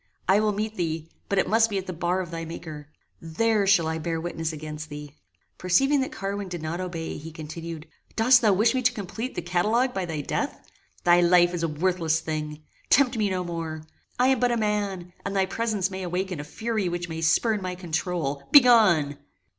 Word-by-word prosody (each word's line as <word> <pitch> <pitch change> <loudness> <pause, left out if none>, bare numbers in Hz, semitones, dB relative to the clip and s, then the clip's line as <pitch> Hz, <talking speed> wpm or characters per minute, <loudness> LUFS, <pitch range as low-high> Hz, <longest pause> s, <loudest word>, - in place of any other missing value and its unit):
I 190 +3 +5
will 215 0 +2
meet 215 +2 -3
thee, 165 -2 -3 0.2
but 200 - 0
it - - +2
must 225 +3 +3
be 200 - -2
at 190 - -3
the 185 - -5
bar 175 +2 -1
of 175 -2 -7
thy 165 0 -4
Maker. 155 -2 -8 0.3
There 200 +5 +1
shall 190 -4 +4
I 160 0 -2
bear 165 +1 -2
witness 165 -1 -3
against 155 0 -7
thee." 150 -1 -8 0.5
Perceiving 270 +11 +3
that 265 +4 -3
Carwin 200 -6 -4
did 175 -3 -6
not 165 +3 -3
obey, 175 -3 -5
he 160 +2 -9
continued; 160 0 -7 0.3
"Dost 240 +2 +5
thou 215 - +4
wish 215 +5 +3
me 260 - 0
to 250 0 +3
complete 225 +4 -5
the 175 - -3
catalogue 215 +9 +1
by 190 -2 -2
thy 160 -3 -3
death? - - -3 0.4
Thy 175 0 +5
life 175 0 +5
is 175 - -2
a 165 - +1
worthless 165 0 0
thing. 155 -1 -5 0.3
Tempt 265 -2 +4
me 215 -3 +1
no 185 -1 -1
more. 165 -2 -5 0.3
I 250 +1 +4
am 265 -2 +3
but 245 0 +2
a 240 - +1
man, 200 -5 -2
and 200 0 -4
thy 190 -1 +3
presence 205 -2 -1
may 190 0 -5
awaken 180 -1 -3
a - - -4
fury 215 +4 -2
which 175 0 -3
may 160 -1 -5
spurn 205 +6 +2
my 185 -1 -4
controul. 165 -5 -3
Begone!" 210 - +6
180 Hz, 210 wpm, -25 LUFS, 160-210 Hz, 0.5 s, Begone